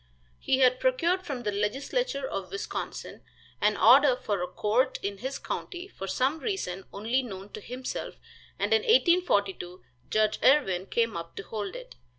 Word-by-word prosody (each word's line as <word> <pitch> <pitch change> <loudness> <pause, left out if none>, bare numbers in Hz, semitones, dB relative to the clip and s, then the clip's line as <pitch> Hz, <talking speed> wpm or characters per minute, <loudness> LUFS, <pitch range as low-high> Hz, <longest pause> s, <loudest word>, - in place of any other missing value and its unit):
He 260 - +1
had 255 -1 +5
procured 375 -8 +2
from 275 -8 -5
the 210 - 0
legislature 275 - -1
of - - -4
Wisconsin 400 +1 -5 0.4
an 210 0 +3
order 260 +3 +7
for 205 -6 -2
a 180 - -1
court 215 +7 +1
in 200 0 -3
his 265 +5 -4
county 360 0 -5
for 195 - -8
some 265 +10 0
reason 195 - -3
only 225 +6 0
known 200 -5 -8
to 215 - -8
himself, 250 +4 -5 0.4
and - - +1
in 445 - +4
1842 340 - +2 0.3
Judge 215 0 +2
Irwin 195 -10 +4
came 230 -1 0
up 170 0 -6
to - - -6
hold 210 - -5
it. - - -9
245 Hz, 160 wpm, -28 LUFS, -, 0.4 s, order